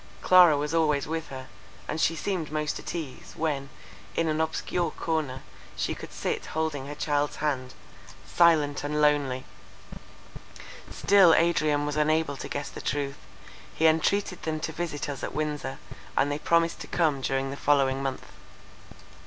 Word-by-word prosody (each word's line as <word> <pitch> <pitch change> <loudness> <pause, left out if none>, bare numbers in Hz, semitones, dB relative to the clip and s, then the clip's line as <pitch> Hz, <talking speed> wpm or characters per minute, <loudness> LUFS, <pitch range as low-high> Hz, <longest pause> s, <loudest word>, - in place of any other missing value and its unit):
—Clara 180 -5 +7
was 150 +2 -2
always 150 -4 +2
with 160 0 -3
her, 130 -1 -8 0.4
and 160 - -2
she 165 - +2
seemed 175 -3 -3
most 150 -1 -2
at - - -6
ease, 155 -6 -7
when, 145 -4 -1 0.5
in 165 - +1
an 155 0 +1
obscure 170 +2 -1
corner, 155 -6 -3 0.3
she - - -1
could - - -9
sit - - -3
holding 155 -4 -2
her 145 - -6
child's 145 0 0
hand, 130 -4 -2 0.5
silent 155 -5 +3
and 150 +1 -1
lonely. 145 -4 +2 1.4
Still 195 -5 +5
Adrian 155 -3 +2
was 150 0 -2
unable 155 -1 +2
to - - -7
guess 145 0 -3
the - - -8
truth; 140 0 -2 0.6
he 160 - +1
entreated 180 +4 +2
them 155 -1 -2
to 160 - -3
visit 160 -2 -4
us 145 -2 -5
at - - -4
Windsor, 150 -3 -3 0.4
and 145 +1 +3
they 145 - -2
promised 165 +1 +2
to - - -7
come 155 -6 +1
during 135 0 -1
the - - -4
following 135 -2 +2
month. 135 -1 -3
150 Hz, 160 wpm, -27 LUFS, 140-160 Hz, 1.4 s, Clara